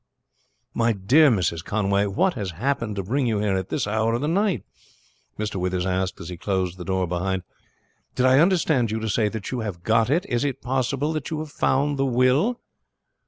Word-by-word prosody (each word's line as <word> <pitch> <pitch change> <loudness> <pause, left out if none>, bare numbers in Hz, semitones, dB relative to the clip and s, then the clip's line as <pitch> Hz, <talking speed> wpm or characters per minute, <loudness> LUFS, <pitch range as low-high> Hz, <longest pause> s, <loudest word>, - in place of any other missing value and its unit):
"My 115 0 +2
dear 130 +11 +5
Mrs. 90 -7 0
Conway, 100 0 +1
what 180 - +1
has 100 -7 -4
happened 115 -2 -1
to 100 - -3
bring 125 +7 0
you 110 -2 +1
here 100 -2 0
at 95 -1 -3
this - - -1
hour 110 +2 0
of 120 - -2
the 150 - -1
night?" 195 +3 +1 0.7
Mr. 105 -2 -3
Withers 90 0 -1
asked 95 0 -1
as 85 - -8
he 90 - -6
closed 95 -1 -2
the - - -5
door 95 +1 0
behind. 90 +2 -2 0.7
"Did 125 - +2
I 130 +1 +5
understand 160 - +3
you 110 +1 -2
to 110 - -3
say 105 0 +1
that 110 -2 -6
you 125 - -2
have 100 -6 -5
got 115 +2 +2
it? 165 +6 +1
Is 120 +1 -1
it 140 -3 -2
possible 135 +4 -1
that 155 -2 -4
you 160 - -3
have 155 -1 -6
found 145 +1 +1
the 135 - +2
will?" 130 - +2
115 Hz, 210 wpm, -24 LUFS, 95-135 Hz, 0.7 s, dear